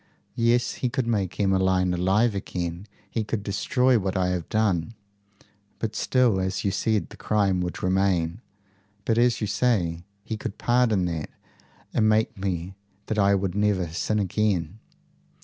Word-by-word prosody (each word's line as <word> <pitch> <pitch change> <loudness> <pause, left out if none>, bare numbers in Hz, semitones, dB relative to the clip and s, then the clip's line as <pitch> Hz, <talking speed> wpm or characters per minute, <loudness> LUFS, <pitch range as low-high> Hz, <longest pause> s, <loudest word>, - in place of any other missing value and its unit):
"Yes. 120 +1 +2
He 125 - +1
could 130 0 -1
make 100 -6 -1
Emmeline 95 -2 +2
alive 95 +6 +2
again. 90 -1 -4 0.2
He 110 +2 -2
could 105 -1 -3
destroy 125 +5 +2
what 95 -1 -2
I 90 -1 +1
have 90 -3 -3
done." 110 -2 0 0.8
"But 110 -1 -3
still, 125 -6 +2
as 95 +2 -2
you 100 - +2
say, 110 +2 +1
the - - -5
crime 100 -4 +1
would 90 0 -4
remain." 95 0 +1 0.6
"But, 115 0 +2
as 120 -1 +3
you - - +1
say, 95 -6 0 0.2
he 110 - -4
could 105 - -6
pardon 120 -6 +2
that, 80 -3 -3 0.6
and 110 -1 +3
make 110 +1 +2
me 95 -2 -3 0.3
that 110 - -2
I 100 0 +4
would 95 -2 -1
never 105 -1 +1
never 85 -2 -4
sin 105 +5 -1
again." 100 -2 0
100 Hz, 160 wpm, -25 LUFS, 90-110 Hz, 0.8 s, I